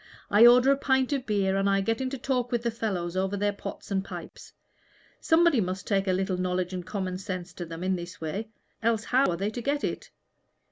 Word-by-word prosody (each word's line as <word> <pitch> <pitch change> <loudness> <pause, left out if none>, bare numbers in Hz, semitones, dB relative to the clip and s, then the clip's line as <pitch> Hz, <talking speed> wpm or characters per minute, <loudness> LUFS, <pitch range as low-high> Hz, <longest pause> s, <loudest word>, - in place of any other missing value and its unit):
I 215 +4 +8
order 250 +3 +6
a 275 - +3
pint 265 0 +1
of 270 -2 -2
beer, 195 -3 +1
and 195 0 +2
I 195 0 +2
get 225 +5 -1
into 260 +1 -2
talk 250 -1 -1
with 240 -1 0
the 235 - 0
fellows 185 -6 -3
over 190 +2 0
their 205 +1 0
pots 200 - -8
and 190 -1 0
pipes. - - -9 0.7
Somebody 325 -6 +4
must 185 0 -3
take 195 -1 0
a - - +3
little 185 0 0
knowledge 180 0 -1
and 180 -1 -4
common 185 -1 -4
sense 185 -2 -5
to 175 - -6
them 165 +1 -7
in 190 0 +1
this 175 0 -7
way, 195 +8 -4 0.3
else 225 -1 +1
how 260 +3 +3
are 170 - -1
they 200 +4 -1
to 240 - -5
get 285 +4 -1
it? - - -3
200 Hz, 225 wpm, -27 LUFS, 185-240 Hz, 0.7 s, I